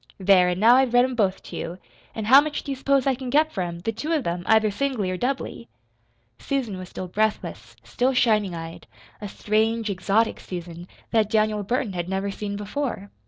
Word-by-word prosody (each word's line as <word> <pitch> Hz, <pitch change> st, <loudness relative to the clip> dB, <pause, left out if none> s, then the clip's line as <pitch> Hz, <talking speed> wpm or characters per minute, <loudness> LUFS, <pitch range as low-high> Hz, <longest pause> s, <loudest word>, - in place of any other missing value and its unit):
There! 185 Hz, -1 st, +5 dB
an' 180 Hz, -, -1 dB
now 235 Hz, +4 st, +6 dB
I've 260 Hz, -2 st, +2 dB
read 245 Hz, +1 st, +6 dB
'em 260 Hz, -, -3 dB
both 200 Hz, -5 st, 0 dB
to -, -, -9 dB
you 170 Hz, +2 st, -5 dB, 0.4 s
an' 220 Hz, -, -4 dB
how 265 Hz, +6 st, +8 dB
much 300 Hz, 0 st, -4 dB
do 280 Hz, -, -5 dB
you -, -, -2 dB
s'pose 275 Hz, 0 st, +1 dB
I 270 Hz, -, +3 dB
can 255 Hz, 0 st, -6 dB
get 305 Hz, +4 st, +3 dB
for 195 Hz, -, -3 dB
'em 170 Hz, -1 st, -4 dB
the 225 Hz, -, -1 dB
two 295 Hz, +9 st, -5 dB
of 300 Hz, -6 st, 0 dB
'em, 175 Hz, +1 st, -2 dB
either 220 Hz, -1 st, +4 dB
singly 235 Hz, -5 st, -1 dB
or -, -, -2 dB
doubly?" 245 Hz, -, -3 dB, 0.7 s
Susan 240 Hz, -9 st, -3 dB
was 185 Hz, 0 st, -8 dB
still 185 Hz, -, -6 dB
breathless, 180 Hz, -, -2 dB
still 245 Hz, -, 0 dB
shining 210 Hz, -7 st, +2 dB
eyed 165 Hz, 0 st, -8 dB, 0.3 s
a 205 Hz, -, -4 dB
strange, 220 Hz, +2 st, 0 dB
exotic 200 Hz, +4 st, +1 dB
Susan, 175 Hz, -1 st, -8 dB, 0.2 s
that 220 Hz, -2 st, +2 dB
Daniel 215 Hz, -1 st, +1 dB
Burton 240 Hz, +1 st, -2 dB
had 175 Hz, 0 st, -4 dB
never 195 Hz, +1 st, -2 dB
seen 200 Hz, 0 st, -5 dB
before. 210 Hz, 0 st, -4 dB
215 Hz, 210 wpm, -24 LUFS, 185-250 Hz, 0.7 s, how